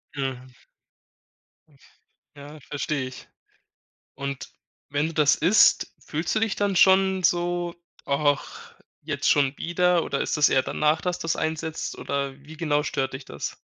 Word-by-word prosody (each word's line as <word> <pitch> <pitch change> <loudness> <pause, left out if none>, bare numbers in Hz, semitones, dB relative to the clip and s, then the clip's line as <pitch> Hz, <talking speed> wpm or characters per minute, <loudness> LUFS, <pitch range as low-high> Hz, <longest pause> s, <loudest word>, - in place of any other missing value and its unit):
Mhm. 130 -2 -4 1.9
Ja, 145 +2 -11
verstehe 145 -1 -3
ich. 130 - -11 0.9
Und 140 -1 -5 0.4
wenn 145 +2 0
du 165 - -8
das 150 -2 +4
isst, 210 +4 +4
fühlst 160 +5 -2
du 215 - +1
dich 225 -3 0
dann 200 -1 0
schon 190 0 +5
so: 175 -1 +1 0.3
„Och, 145 0 +1 0.5
jetzt - - -1
schon 140 -1 +2
wieder?“ 175 0 +2
Oder 140 - -2
ist - - -1
das 150 - +6
eher 130 - +3
danach, 155 +1 +1
dass 180 -1 -1
das 165 0 -1
einsetzt? 160 0 -3
Oder 140 -1 -2
wie 155 +3 -13
genau 150 -2 +1
stört 135 -3 -2
dich 130 +1 -7
das? 70 - -6
150 Hz, 145 wpm, -25 LUFS, 140-175 Hz, 1.9 s, das